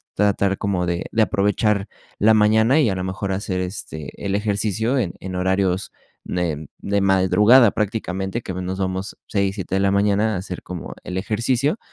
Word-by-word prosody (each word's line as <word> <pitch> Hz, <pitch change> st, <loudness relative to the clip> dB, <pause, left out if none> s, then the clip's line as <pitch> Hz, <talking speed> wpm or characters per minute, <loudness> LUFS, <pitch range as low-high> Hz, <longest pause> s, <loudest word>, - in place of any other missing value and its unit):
tratar 100 Hz, -1 st, +2 dB
como 95 Hz, -3 st, 0 dB
de 85 Hz, 0 st, -2 dB
de 115 Hz, -, +2 dB
aprovechar 100 Hz, 0 st, +1 dB, 0.3 s
la 110 Hz, +2 st, +5 dB
mañana 110 Hz, +6 st, +4 dB
y 140 Hz, -, +3 dB
a 95 Hz, -, -1 dB
lo 90 Hz, -, -3 dB
mejor 95 Hz, +1 st, -3 dB
hacer, 95 Hz, -1 st, -2 dB
este, 90 Hz, -5 st, -6 dB
el 100 Hz, 0 st, -1 dB
ejercicio 105 Hz, +4 st, 0 dB
en 100 Hz, -10 st, -1 dB
en 95 Hz, -1 st, -6 dB
horarios 95 Hz, +1 st, 0 dB, 0.3 s
de 80 Hz, -4 st, -3 dB
de 100 Hz, 0 st, 0 dB
madrugada 100 Hz, +5 st, +5 dB
prácticamente, 100 Hz, 0 st, -2 dB
que 95 Hz, -, -6 dB
a -, -, -7 dB
menos 95 Hz, +1 st, -4 dB
vamos 95 Hz, +1 st, -3 dB
6 100 Hz, -2 st, 0 dB
7 95 Hz, -2 st, -3 dB
de -, -, +2 dB
la 100 Hz, 0 st, +3 dB
mañana 100 Hz, +2 st, +2 dB
a -, -, -1 dB
hacer 90 Hz, 0 st, -6 dB
como 90 Hz, -3 st, -7 dB
el 90 Hz, -, -5 dB
ejercicio, 120 Hz, -, 0 dB
100 Hz, 180 wpm, -21 LUFS, 95-105 Hz, 0.3 s, la